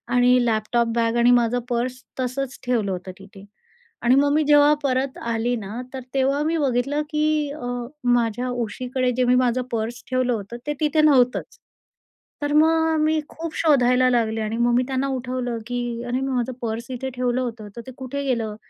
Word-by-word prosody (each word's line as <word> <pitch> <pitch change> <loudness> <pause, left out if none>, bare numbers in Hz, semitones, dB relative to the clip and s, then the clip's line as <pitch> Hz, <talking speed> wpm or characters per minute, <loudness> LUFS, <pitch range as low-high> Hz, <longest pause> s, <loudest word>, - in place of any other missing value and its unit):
आणि 245 0 +4
laptop 230 +1 +1
bag 230 0 +1
आणि 240 +1 +5
माझं 245 0 +3
पर्स 245 +1 -2 0.2
तसंच 260 +1 -3
ठेवलं 230 -6 0
होतं 185 0 -5
तिथे 195 0 -14 0.6
आणि 245 +2 +4
मग 285 +1 +3
मी 310 +1 +3
जेव्हा 295 0 +6
परत 260 0 0
आली 230 +1 -1
ना, 215 +3 -6
तर 265 - -4
तेव्हा 275 +2 +1
मी 325 +2 0
बघितलं 275 +1 0
की 305 -1 0
अ, - - -5 0.4
माझ्या 245 0 +1
उशीकडे 250 +2 -2
जे 255 - +3
मी 250 +1 +4
माझं 250 0 +2
पर्स 230 +1 -3
ठेवलं 255 -1 +1
होतं, 220 +1 -5
ते 295 - 0
तिथे 310 0 +3
नव्हतंच. 260 -5 +3 0.8
तर 290 0 -1
मग 320 +1 +3
मी 310 0 +2
खूप 330 0 -7
शोधायला 255 -5 +4
लागले 225 -2 +1
आणि 215 +1 -2
मग 240 0 +2
मी 250 - +3
त्यांना 270 0 -1
उठवलं 250 -2 -3
की 245 0 -2 0.2
"अरे, 245 +1 -2
मी 270 0 -2
माझं 250 0 -1
पर्स 230 0 -4
इथे 260 +1 -4
ठेवलं 250 0 0
होतं 230 -4 -5
तर 235 - -6
ते 260 - -7
कुठे 265 +2 -4
गेलं?" 230 -5 -1
250 Hz, 185 wpm, -23 LUFS, 235-275 Hz, 0.8 s, जेव्हा